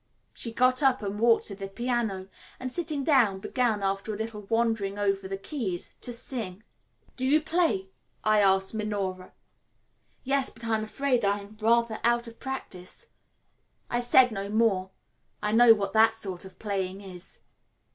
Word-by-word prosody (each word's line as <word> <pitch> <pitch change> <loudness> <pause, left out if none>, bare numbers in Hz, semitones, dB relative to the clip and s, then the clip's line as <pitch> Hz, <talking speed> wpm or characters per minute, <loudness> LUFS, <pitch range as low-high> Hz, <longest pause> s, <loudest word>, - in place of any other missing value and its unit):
She 230 - -5
got 255 +3 +3
up 265 -6 +3
and 205 +1 -3
walked 230 0 +4
to 200 - -3
the 195 0 -6
piano, 220 -3 -2 0.3
and, 255 0 -4
sitting 310 -3 -2
down, 250 -10 +4
began, 220 0 0
after 195 +2 -1
a 210 - -4
little 220 -1 -5
wandering 225 -4 0
over 195 -1 0
the 195 0 -4
keys, 195 - -4
to 245 - -4
sing. 225 -5 -4 0.5
"Do 255 - -3
you 300 +3 +5
play?" 315 - 0 0.4
I 215 0 +4
asked 190 0 +3
Minora. 200 -4 -3 0.9
"Yes, 275 0 +1
but 230 +1 -11
I 225 -1 +1
am 215 - -1
afraid 250 +2 0
I 200 0 +2
am 200 +2 -13
rather 230 0 +2
out 235 0 +2
of 230 0 -11
practice." 195 -9 -7 0.8
I 240 - +1
said 245 +1 +5
no 200 -1 -4
more. 210 -4 +2 0.5
I 210 0 -1
know 230 0 +7
what 200 -2 -3
that 225 0 +5
sort 190 -5 -6
of 190 -1 -13
playing 195 -2 -3
is. 185 -2 -11
220 Hz, 165 wpm, -27 LUFS, 195-240 Hz, 0.9 s, know